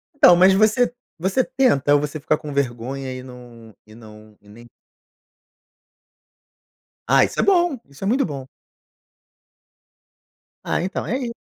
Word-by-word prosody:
Então, 180 -10 +7
mas 185 +2 +5
você 215 +5 +2 0.3
você 190 +9 0
tenta? 250 - +1
Ou 145 - +3
você 150 +1 -5
fica 155 +1 0
com 150 -2 -8
vergonha 130 0 -3
e 130 - -8
não 120 -4 -14
e 110 - -17
não 110 -2 -16
e 105 - -24
nem 115 +3 -15 2.4
Ah, - - +5
isso - - -3
é - - +3
bom, 350 -8 +2
isso 140 +7 -13
é - - -1
muito 260 +6 +1
bom. 135 -5 -7 2.2
Ah, - - -1
então 185 +3 -4
é 255 - -2
i 250 -3 -4
145 Hz, 145 wpm, -21 LUFS, -, 2.4 s, Então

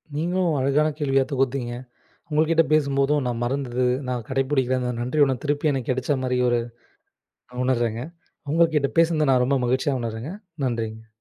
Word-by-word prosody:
நீங்களும் 170 0 0
அழகான 140 +3 +2
கேள்வியைத் 135 -2 +1
தொகுத்தீங்க. 135 -2 -1 0.6
உங்ககிட்ட 160 +2 +3
பேசும்போதும் 140 -1 +2
நான் 120 -1 -3
மறந்து, 125 -1 -1 0.2
நான் 125 -3 -3
கடைபிடிக்கிற 130 -1 +1 0.2
நன்றி 125 +5 0
உணர்வு 130 -2 -2
திருப்பியும் 145 0 +1
எனக்குக் 130 -2 -2
கிடைச்ச 130 +2 -1
மாதிரி 125 0 0 1.1
நான் 125 0 -5
உணர்றேங்க. 120 -3 0 0.5
உங்ககிட்ட 155 -3 +3
பேசினது 160 -3 +3
நான் 125 -1 +4
ரொம்ப 140 +2 +2
மகிழ்ச்சியா 130 +3 +1
உணர்றேங்க. 115 +7 -5 0.3
நன்றிங்க. 110 -2 -3
135 Hz, 135 wpm, -24 LUFS, 125-150 Hz, 1.1 s, நான்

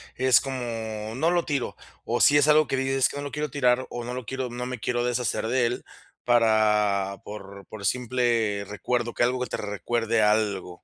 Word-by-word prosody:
es 130 0 +5
como: 115 -5 -4
"No 160 +5 +2
lo 175 -1 +1
tiro"? 140 -4 -2 0.3
¿O - - -1
si 145 - +6
es 145 +1 +4
algo 155 0 +5
que 135 - -1
dices: 135 0 0
"Es - - +3
que - - -7
no 145 - -4
lo 145 - -5
quiero 150 -2 -3
tirar 125 -2 +2
o 120 - -5
no 125 +1 -5
lo 125 -2 -5
quiero 130 0 -4
no 125 +1 -5
me 125 -2 -5
quiero 120 +1 -1
deshacer 120 -2 -1
de 125 0 +2
él", 120 - -4 0.4
para 105 -4 +2
por 100 -1 -10
por 105 -2 -8
simple 120 -5 0
recuerdo, 120 +3 -2
que - - +1
algo 125 +1 +1
te - - -4
recuerde 110 +3 -1
algo? 105 -4 0
120 Hz, 205 wpm, -25 LUFS, 105-130 Hz, 0.4 s, si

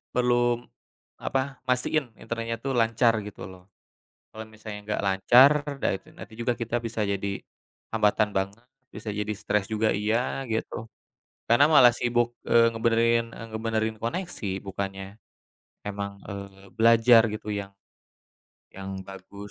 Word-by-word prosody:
perlu 120 -1 +2 0.6
apa, 135 0 -2
mastiin 125 +1 +1
internet 115 -1 -4
itu 135 - -1
lancar 115 0 +3
gitu 105 - -10
loh. 95 -1 -13 0.7
Kalo 110 - -8
misalnya 110 -1 -9
nggak 105 - -2
lancar, 120 +8 +6 0.3
dah - - +2
itu 140 - -19
nanti 120 - -11
juga 120 +1 0
kita 115 0 -2
bisa 115 -1 -2
jadi 100 0 -2 0.5
hambatan 105 -1 +2
banget, 100 +5 -3 0.3
bisa 110 - -7
jadi 105 +1 -2
stres 105 -1 -1
juga 110 0 +1
iya, 115 +6 0
gitu. 110 0 -3 0.6
Karena 120 +5 +6
malah 120 -4 +8
sibuk, 120 0 0
eee, 115 0 +6
ngebenerin 115 0 +2
eee, 115 - -8
ngebenerin 110 0 -1
koneksi 125 - -3 0.2
bukannya 95 0 -4 0.8
emang, 100 0 -4
eee, 100 -1 -9
belajar 115 0 +6
gitu 110 - -8
yang 100 0 -9 1.0
yang 95 0 -7 0.2
bagus 100 +1 -10
115 Hz, 130 wpm, -26 LUFS, 100-120 Hz, 1.0 s, malah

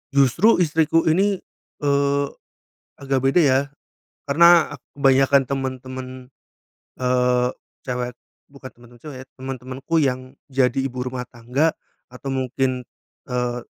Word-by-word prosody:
Justru 140 - +5
istriku 160 0 +2
ini, 195 +5 +2 0.5
eee, 140 0 +2 0.7
agak 135 -1 -1
beda 135 +7 +3
ya. 135 -1 +4 0.7
Karena 170 +1 +5 0.2
kebanyakan 135 0 +4
temen-temen, 130 -1 -4 0.9
eee, 125 -1 +2 0.4
cewek 125 -1 -4 0.3
bukan 135 -2 -11
temen-temen 120 0 -18
cewek 150 -4 -9
ya, - - -42
teman-temanku 130 +3 -6
yang 130 -2 +1 0.3
jadi 130 -2 +2
ibu 125 -2 -3
rumah 125 0 -4
tangga 125 +7 0 0.4
atau 130 +2 -7
mungkin, 130 0 -1 0.5
eee, 125 -1 -2
130 Hz, 110 wpm, -22 LUFS, 125-140 Hz, 0.9 s, Justru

